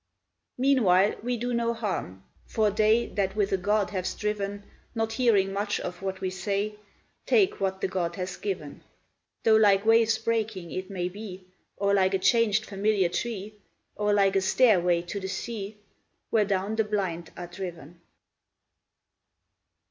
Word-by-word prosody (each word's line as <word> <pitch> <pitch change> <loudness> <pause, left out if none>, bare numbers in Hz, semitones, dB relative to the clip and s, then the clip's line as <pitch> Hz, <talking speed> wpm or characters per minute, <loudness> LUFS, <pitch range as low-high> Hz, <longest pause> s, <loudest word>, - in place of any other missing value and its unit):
Meanwhile 215 -8 +4
we 245 +2 -1
do 245 +2 -2
no 235 0 0
harm; 185 - -4 0.2
for 215 -2 +1
they 215 +3 +3
That 195 -1 -2
with 205 -2 +1
a 195 - +2
god 205 +2 0
have 185 -2 -2
striven, 205 -1 -3 0.3
Not 225 0 -1
hearing 210 -5 +2
much 205 +1 -1
of 180 0 -6
what 190 -1 -4
we 185 - -1
say, 200 +3 -2 0.5
Take 410 -2 +3
what 190 0 -1
the - - +1
god 175 -2 -2
has 185 -1 -4
given; 175 -8 -5 0.6
Though 220 -1 +6
like 205 -2 +4
waves 225 0 +4
breaking 220 -6 -2
it 185 0 -5
may 180 -3 -2
be, 190 -1 -8 0.3
Or 200 0 +1
like 190 -1 +3
a - - +3
changed 215 +2 +3
familiar 200 -2 +1
tree, 215 +1 -4 0.4
Or 210 0 0
like 195 -1 +3
a 195 - +3
stairway 180 -5 +3
to 175 +4 -5
the 190 - -5
sea 210 +1 -5 0.5
Where 215 -2 +3
down 200 +2 -1
the 220 - +3
blind 190 -6 -3
are 175 - -5
driven. 175 -2 -8
200 Hz, 155 wpm, -27 LUFS, 185-220 Hz, 0.6 s, Though